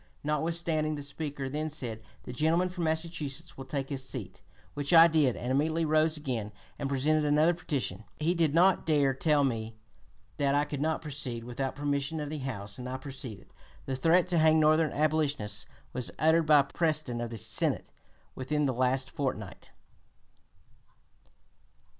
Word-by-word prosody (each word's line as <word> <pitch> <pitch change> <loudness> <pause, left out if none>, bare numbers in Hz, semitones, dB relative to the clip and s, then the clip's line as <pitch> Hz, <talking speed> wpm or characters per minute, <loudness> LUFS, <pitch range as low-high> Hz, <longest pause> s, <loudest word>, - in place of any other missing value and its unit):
notwithstanding. 155 0 0
The 145 - -6
Speaker 145 -1 -4
then 150 +3 -2
said, 120 -7 -5 0.2
'The - - -7
gentleman 165 +7 +2
from 180 -2 -3
Massachusetts 160 -1 -3
will 135 - -8
take 135 0 -3
his 135 -2 -3
seat;' 105 -9 -6 0.3
which 145 +3 -2
I 165 0 +10
did 155 -7 +3
and 125 - -3
immediately 160 +4 +1
rose 155 +1 +2
again 120 -8 -3 0.3
and 140 -2 -2
presented 150 +3 +2
another 150 +3 +4
petition. 145 -9 -3
He 160 +3 +2
did 165 -4 +1
not 180 0 +4
dare 145 -4 +3
tell 145 +2 +2
me 115 -4 -2 0.6
that 140 -1 +2
I 145 +1 +2
could 145 -2 -5
not 160 +1 0
proceed 135 -6 -4
without 125 +3 -4
(p. 145 - -10
258) - - -4
permission 140 +2 -1
of 150 -1 -4
the 155 - -4
House, 100 -2 -7
and 125 0 -5
I 130 - -3
proceeded. 130 -7 -9 0.3
The 135 - -2
threat 165 +6 +3
to 175 -2 +3
hang 155 0 +5
Northern 155 0 +4
abolitionists 150 -7 0 0.3
was 125 -1 -1
uttered 160 +1 +3
by 150 -2 +7
Preston 150 -5 -1
of 120 - -3
the 115 - -6
Senate - - 0 0.4
within 150 +3 -1
the 130 - +1
last 130 +1 0
fortnight." 110 -9 -4
145 Hz, 170 wpm, -29 LUFS, 130-155 Hz, 0.6 s, I